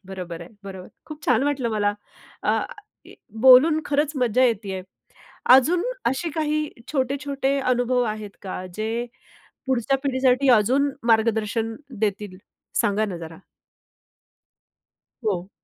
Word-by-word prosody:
बरोबर 180 -3 -7
आहे. 170 - -11 0.2
बरोबर. 190 -2 -8 0.2
खूप 305 -1 -10
छान 250 -2 +2
वाटलं 270 -5 0
मला. 205 -1 0 0.5
अ, - - +1 0.8
बोलून 305 +5 +8
खरंच 295 +1 +1
मज्जा 250 0 +2
येते 215 -5 0
आहे. 185 - -5 0.7
अजून 340 - +3 0.2
असे 325 +6 0
काही 305 -1 0 0.2
छोटे-छोटे 275 0 -1
अनुभव 250 -1 +1
आहेत 210 -2 -8
का 185 -1 -6
जे 215 +1 -2 0.8
पुढच्या 265 +1 +1
पिढीसाठी 260 0 +2
अजून 270 +7 +2 0.2
मार्गदर्शन 225 0 +1 0.3
देतील? 205 -2 -2 0.4
सांगा 205 +1 +1
ना 185 -4 -5
जरा? 165 -1 -9 1.9
हो. 185 -3 -1
245 Hz, 115 wpm, -23 LUFS, 205-275 Hz, 1.9 s, बोलून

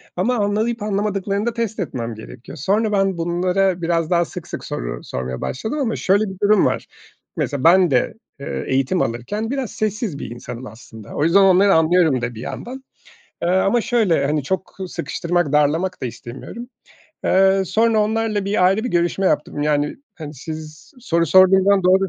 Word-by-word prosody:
ama 225 +8 +1
anlayıp 215 +3 0
anlamadıklarını 200 0 -1
da 235 - -1
test 230 -2 -3
etmem 120 -9 -4
gerekiyor. 120 +7 -11
Sonra 210 - +1
ben 195 -3 +1
bunlara 180 +2 0
biraz 165 -1 0
daha 170 -1 +3
sık - - -9
sık - - -7
soru - - -4
sormaya 65 0 -5
başladım 220 - -3
ama 230 -5 0
şöyle 200 +3 +2
bir 190 - -7
durum 205 -1 +4
var, - - -1 0.5
mesela 140 -2 -2
ben 175 -1 +5
de, 125 - +1 0.3
eee, 140 - -4
eğitim 135 +7 +1
alırken 205 - -3
biraz 270 -6 -3
sessiz 210 - -3
bir - - -6
insanım 120 +1 -8
aslında. 110 -1 -12
O 145 - 0
yüzden 170 +5 +5
onları 195 +1 +5
anlıyorum 160 -5 +3
da 120 -1 -4
bir 110 - -8
yandan, 260 - -7 0.6
eee, 170 - +1
ama 195 +6 +2
şöyle, 220 - +1
hani, 150 0 0
çok 190 +6 -4
sıkıştırmak 170 -2 -2
darlamak 155 +5 +1
da - - 0
istemiyorum. 130 - -8 0.6
Eee, 195 0 +4
sonra 225 +2 +2
onlarla 215 -1 0
bir 200 -2 +1
ayrı 200 +5 +1
bir - - -1
görüşme 175 +2 +1
yaptım. 145 -2 0
Yani, 150 -1 0 0.2
hani, 155 -2 -8
siz 155 - -9
soru 170 -7 +1
sorduğum 190 +3 +6
zaman 200 -1 +4
doğru 190 +1 +4
185 Hz, 175 wpm, -20 LUFS, 150-205 Hz, 0.6 s, sorduğum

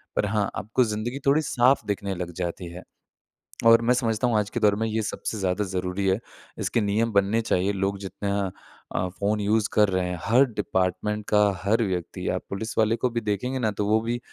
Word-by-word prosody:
पर - - +2
हाँ, 105 0 0
आपको 110 +5 +1
ज़िंदगी 115 +4 -3
थोड़ी 140 +3 +4
साफ़ 130 -1 +2
दिखने 100 -1 -2
लग 85 -1 -5
जाती 85 +1 -4
है। 90 - -9 0.8
और 115 0 +7
मैं 120 +2 +3
समझता 115 -1 0
हूँ 115 -3 +2
आज 105 -1 0
के - - -3
दौर 105 -1 +4
में 110 +2 -1
ये 110 0 -1
सबसे 110 +1 -4
ज़्यादा 95 +2 0
ज़रूरी 90 +1 -2
है, 95 +2 +2 0.4
इसके 115 - 0
नियम 110 +3 +1
बनने 100 +3 +3
चाहिए। 100 -3 +1
लोग 100 +1 -1
जितना 100 0 -2 0.4
अ, 90 - 0
फ़ोन 100 +3 -1
यूज़ 105 +1 +1
कर 105 -1 +4
रहे 95 -1 0
हैं, 90 - -4
हर 125 +4 +5
डिपार्टमेंट 105 -1 -1
का 105 0 +5 0.2
हर 110 +4 +2
व्यक्ति, 90 -5 -3
आप - - -1
पुलिस 110 +3 -5
वाले 110 +1 +3
को 125 - 0
भी 115 0 -2
देखेंगे 115 +5 -2
ना 110 -3 +1
तो 105 - 0
वो 110 +1 +4
भी 120 +1 -2
105 Hz, 210 wpm, -25 LUFS, 100-115 Hz, 0.8 s, और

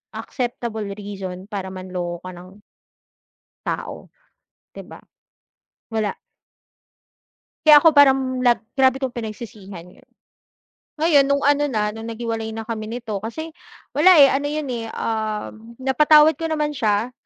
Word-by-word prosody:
acceptable 235 -4 -4
reason 195 -2 -8
para 195 -2 -4
manloko 180 -2 -6
ka 185 - -7
ng 185 +3 -14 1.0
tao - - -5 0.6
'di - - -9
ba? - - -12 0.9
Wala. 215 -2 -1 1.5
Kaya 295 -1 +9
ako 330 - +7
parang 265 -2 +4
lag 240 -1 +3 0.2
grabe 260 -1 +4
kong 260 -2 -2
pinagsisihan 210 -5 -8
y'on. - - -23 0.8
Ngayon 305 -3 +3
nung 280 0 +1
ano 290 +1 +3
na 215 -6 -1
nung 225 +1 -8
naghiwalay 225 -1 -4
na 225 - -5
kami 220 -2 -4
nito 225 -2 -5
kasi 230 +11 -6 0.5
wala, 365 +5 +7
eh, 275 - +8
ano 280 +1 -1
yun, 300 -1 -3
eh, 235 -2 -4
um, 220 +1 -4
napatawad 300 +4 +5
ko 330 - -4
naman 305 -2 -1
siya. 230 -3 -1
230 Hz, 130 wpm, -21 LUFS, 210-280 Hz, 1.5 s, Kaya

